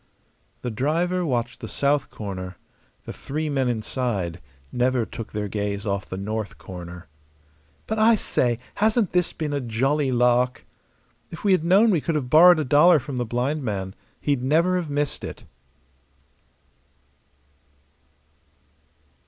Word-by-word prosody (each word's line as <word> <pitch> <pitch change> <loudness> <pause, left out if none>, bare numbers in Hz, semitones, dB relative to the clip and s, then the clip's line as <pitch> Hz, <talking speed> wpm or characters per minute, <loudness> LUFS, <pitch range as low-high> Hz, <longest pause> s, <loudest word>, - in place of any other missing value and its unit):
The 125 - -2
driver 170 +10 0
watched 120 -5 -2
the - - -7
south 140 +1 0
corner; 95 -3 -6 0.5
the - - -6
three 155 +2 -4
men 135 -3 0
inside 110 -6 -2 0.3
never 125 -1 +1
took 115 - -8
their 105 -1 -3
gaze 100 0 -3
off 100 -2 -2
the 95 - -5
north 105 +2 -4
corner. 90 -2 -9 0.8
"But, 220 0 -2
I 225 +1 +6
say, 120 - 0 0.2
hasn't 220 -1 +2
this 180 -1 +1
been 150 -2 -4
a 140 - -1
jolly 130 +4 0
lark?" 125 +1 +2 0.6
"If 165 - -10
we 205 - +3
had 185 -4 +3
known 200 +6 +5
we 170 -6 +2
could 165 - -2
have 130 -4 -2
borrowed 175 +3 +8
a 155 - -1
dollar 150 +6 +6
from 140 -2 -5
the 120 - -1
blind 125 +6 -1
man; 95 -5 -3 0.3
he'd 140 -4 0
never 165 +7 +2
have 170 -4 -3
missed 145 0 -2
it." - - -7
130 Hz, 145 wpm, -24 LUFS, 110-155 Hz, 0.8 s, borrowed